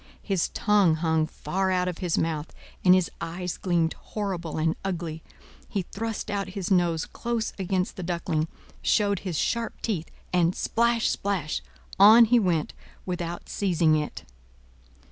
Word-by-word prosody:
His 195 -5 0
tongue 200 -6 +3
hung 160 -1 +1
far 190 +3 -2
out 180 -1 +1
of 180 -2 -3
his 180 -3 0
mouth, 160 -1 -1 0.3
and 180 0 +7
his 185 -2 +1
eyes 180 +1 -3
gleamed 170 -3 +1
horrible 185 -7 -4
and 160 +1 +1
ugly; 170 -4 -3 0.5
he 200 -3 -1
thrust 220 +4 -4
out 200 -2 -1
his 190 0 -3
nose 175 -3 +2
close 235 -2 -3
against 185 -1 -1
the - - -4
Duckling, 170 -3 -1 0.3
showed 200 -2 +2
his 180 -5 -4
Sharp 230 +5 -1
teeth, 180 -8 -2 0.2
and—splash, 225 +7 +2
splash!—on 200 +4 +3
he 240 +2 +4
went, 175 -7 0 0.3
without 175 -2 -4
seizing 170 -5 +2
it. 150 -1 -3
180 Hz, 140 wpm, -26 LUFS, 165-200 Hz, 0.5 s, and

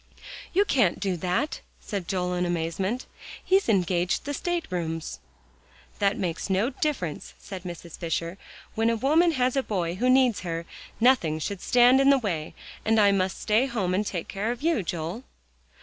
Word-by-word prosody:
"You 400 +3 +3
can't 240 - +2
do 195 -3 -1
that," 190 - -1 0.2
said 195 -5 -5
Joel 180 -2 -1
in 180 0 0
amazement. 175 +7 -2 0.4
"He's 385 -6 +3
engaged 180 -3 +1
the 285 - -3
state 350 +2 -2
rooms." 165 -2 -3 0.8
"That 200 0 +2
makes 175 0 -3
no 195 +7 +1
difference," 255 - -3
said 190 -3 -8
Mrs. 170 -1 -8
Fisher, 170 +2 -3 0.3
"when 225 +1 +1
a 230 - +2
woman 315 +8 +3
has 255 -2 +1
a 270 - +3
boy 180 -8 -2
who 245 +8 0
needs 255 -3 +4
her, 170 -2 -4 0.3
nothing 225 -11 +3
should 185 +4 -4
stand 250 +2 +5
in 275 - +5
the 280 - +6
way. 175 -11 -3 0.3
And 225 0 +3
I 205 -1 +6
must 190 -1 0
stay 220 +4 +3
at - - -5
home 185 -3 0
and 195 +3 +1
take 180 -5 -4
care 210 +4 -2
of 245 +3 -6
you, 330 -8 +2
Joel." 170 +6 -4
200 Hz, 180 wpm, -26 LUFS, 175-250 Hz, 0.8 s, the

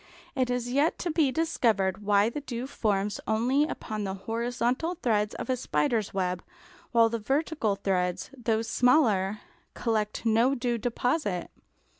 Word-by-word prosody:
It 255 -3 0
is 245 0 -1
yet 285 +5 +2
to 345 - -2
be 305 -4 +2
discovered 220 - +1
why 205 +1 +3
the 290 +5 -5
dew 245 -3 -5
forms 210 -6 -1
only 245 +7 +2
upon 215 -8 -4
the 190 -1 -3
horizontal 240 - -1
threads 210 -8 0
of - - -5
a 260 - +1
spider's 235 -3 0
web, 180 -2 -2 0.5
while 230 -1 +5
the 230 0 -2
vertical 270 -2 0
threads, 185 0 -1
though 225 -3 0
smaller, 225 -5 +2 0.3
collect 220 -1 -1
no 230 +4 +3
dew 240 -2 -1
deposit. 245 - -1
230 Hz, 145 wpm, -28 LUFS, 210-255 Hz, 0.5 s, while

